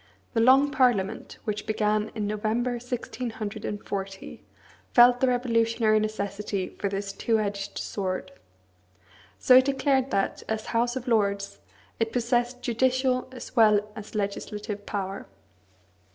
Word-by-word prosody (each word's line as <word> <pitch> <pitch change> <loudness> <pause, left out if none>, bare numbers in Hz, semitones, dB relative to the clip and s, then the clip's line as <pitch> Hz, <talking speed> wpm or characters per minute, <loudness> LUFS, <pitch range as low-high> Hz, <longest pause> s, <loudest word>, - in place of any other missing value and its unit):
The 230 - +1
Long 265 +5 +5
Parliament, 225 -7 +1
which 210 -1 -4
began 215 0 +1
in 215 -2 -2
November 215 +4 -1
1640, 215 -5 -5 0.5
felt 245 0 +7
the 260 - +3
revolutionary 230 -3 +2
necessity 200 -2 -3
for 200 - -1
this 195 0 -4
two 225 +2 +1
edged 200 -1 -3
sword. 185 -1 -3 1.1
So 255 - +6
it 260 - +6
declared 270 -1 +1
that, 195 - -1
as 220 0 -2
House 240 +2 +1
of 255 -1 -5
Lords, 200 -3 0 0.4
it 225 -1 0
possessed 245 +1 0
judicial 255 +1 +1
as 255 - -10
well 210 -2 +4
as 215 +1 -9
legislative 205 0 -4
power. 195 -1 -4
220 Hz, 125 wpm, -26 LUFS, 205-245 Hz, 1.1 s, felt